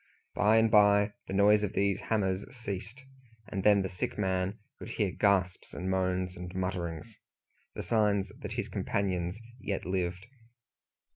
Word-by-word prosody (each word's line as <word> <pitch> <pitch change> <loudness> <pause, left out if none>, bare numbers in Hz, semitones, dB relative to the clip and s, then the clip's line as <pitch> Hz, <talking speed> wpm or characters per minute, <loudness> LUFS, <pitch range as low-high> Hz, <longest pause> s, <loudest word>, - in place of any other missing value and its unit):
By 105 +3 +4
and 110 0 +4
by 105 0 +5
the - - -5
noise 105 +2 +5
of 105 - -2
these 100 0 +1
hammers 95 -3 0
ceased, 115 +3 -6 0.5
and 95 -3 -2
then 100 -2 +5
the - - -1
sick 90 -1 -4
man 95 0 0 0.2
could - - -8
hear 105 -4 0
gasps, 95 -2 +1
and 95 +2 -2
moans, 95 -1 0
and 90 0 -7
mutterings 90 +1 -4 0.6
the - - -4
signs 105 -4 +1
that - - -6
his - - -2
companions 90 -2 -2 0.2
yet 100 -4 -3
lived. 90 0 -2
95 Hz, 150 wpm, -30 LUFS, 90-105 Hz, 0.6 s, by